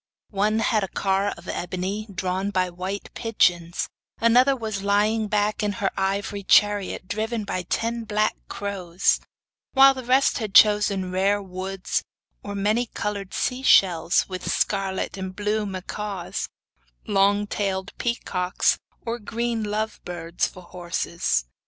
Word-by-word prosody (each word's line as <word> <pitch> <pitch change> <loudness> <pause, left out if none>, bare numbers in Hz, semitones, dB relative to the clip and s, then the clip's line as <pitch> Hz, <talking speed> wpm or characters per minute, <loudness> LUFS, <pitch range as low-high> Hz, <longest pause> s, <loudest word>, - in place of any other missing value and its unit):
One 210 +2 +1
had 215 -2 +2
a - - -1
car 195 +2 0
of - - -14
ebony, 185 +4 -3
drawn 185 +1 -2
by 185 -2 0
white 185 +3 -5
pigeons, 175 -7 +1 0.3
another 250 +4 +5
was 220 -5 -4
lying 210 +2 +2
back 210 +1 0
in 205 -1 0
her 195 -1 -1
ivory 200 +1 -1
chariot, 205 -1 +3
driving 220 +2 -2
ten 225 +6 -2
black 215 0 +1
crows, 190 -3 0 0.5
while 270 0 +8
the 260 -1 -7
rest 260 +3 +3
had 215 -4 -5
chosen 205 -3 +5
rare 195 +2 +2
woods 190 0 -3 0.4
or 205 0 -6
many 215 +5 +1
coloured 200 -3 -4
sea 250 +1 -1
shells, 175 -9 +4
with 185 -1 -4
scarlet 195 -1 -1
and 190 -1 -5
blue 210 +1 -1
macaws, 195 0 -4 0.6
long 205 +1 +3
tailed 195 -2 -2
peacocks, 185 -6 0 0.3
or 235 +1 -2
green 230 +1 -2
love 215 +1 -2
birds 170 -1 -2
for 185 - -12
horses. 170 - -2
200 Hz, 135 wpm, -24 LUFS, 185-215 Hz, 0.6 s, while